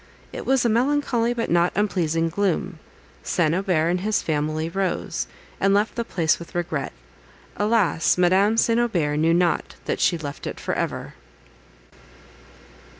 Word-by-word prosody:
It - - -7
was 265 -2 +3
a - - +5
melancholy 240 0 +1
but 235 -5 -2
not 175 +1 +3
unpleasing 165 -5 0
gloom. 185 -1 -1 0.4
St. 165 -3 +1
Aubert 180 -4 +1
and 180 +1 +1
his 210 +3 0
family 155 +1 -1
rose, 190 +2 -2 0.3
and 195 0 +3
left 210 +2 +1
the 235 - -2
place 165 -8 0
with 170 - -11
regret; 160 -5 -2 0.6
alas! 205 -7 +2
Madame 190 +5 +3
St. 230 0 +3
Aubert 170 -11 0
knew 160 +2 +3
not 175 0 0
that - - -2
she 170 - +2
left 145 -3 -7
it - - -6
for - - -3
ever. - - -3
180 Hz, 150 wpm, -23 LUFS, 165-215 Hz, 0.6 s, a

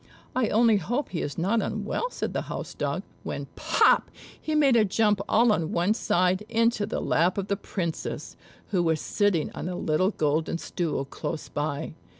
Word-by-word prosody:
"I 255 -3 +2
only 225 -1 +4
hope 240 - -2
he 170 - -3
is 145 - -4
not 200 +7 +1
unwell," - - -2
said - - -4
the - - -1
house - - -5
dog; - - -2 0.2
when, - - -4
pop! - - +3 0.3
he 310 - -2
made 280 -5 +5
a 225 - +6
jump 210 0 +2
all 230 +1 +5
on 165 -6 0
one 175 +5 +2
side 185 -2 +1
into 230 -2 +2
the - - -2
lap 175 +5 +2
of 200 0 -2
the 200 - +2
Princess, 170 -4 -4 0.3
who 185 -4 +1
was 160 -2 +1
sitting 200 -5 +1
on 180 - -5
a 180 - -3
little 175 +2 +1
golden 155 -3 0
stool 165 -5 -2
close 155 +3 -5
by. 145 +1 -3
185 Hz, 180 wpm, -26 LUFS, 165-220 Hz, 0.3 s, a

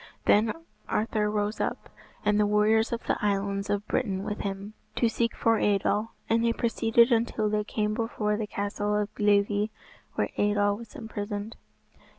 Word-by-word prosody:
Then 215 +1 +4 0.4
Arthur 210 -1 0
rose 210 0 -1
up, - - -2 0.4
and 210 0 +3
the 210 - +4
warriors 215 +2 +3
of 235 0 -3
the - - -1
Islands 200 0 0
of 205 0 -1
Britain 195 -7 -1
with 210 0 -4
him, 195 +1 -4 0.2
to 235 - +3
seek 230 +1 0
for 225 -1 +2
Eidoel; 205 +2 +1 0.2
and 230 +1 +2
they 230 0 +3
proceeded 235 +1 +3
until 225 -2 +1
they 210 0 +1
came 210 0 -1
before 215 -2 -1
the 210 0 -3
castle 205 +1 -2
of 210 0 -1
Glivi, 205 0 +2 0.5
where - - 0
Eidoel 205 0 +2
was 230 +1 -12
imprisoned. 210 -1 -5
210 Hz, 165 wpm, -27 LUFS, 205-225 Hz, 0.5 s, Then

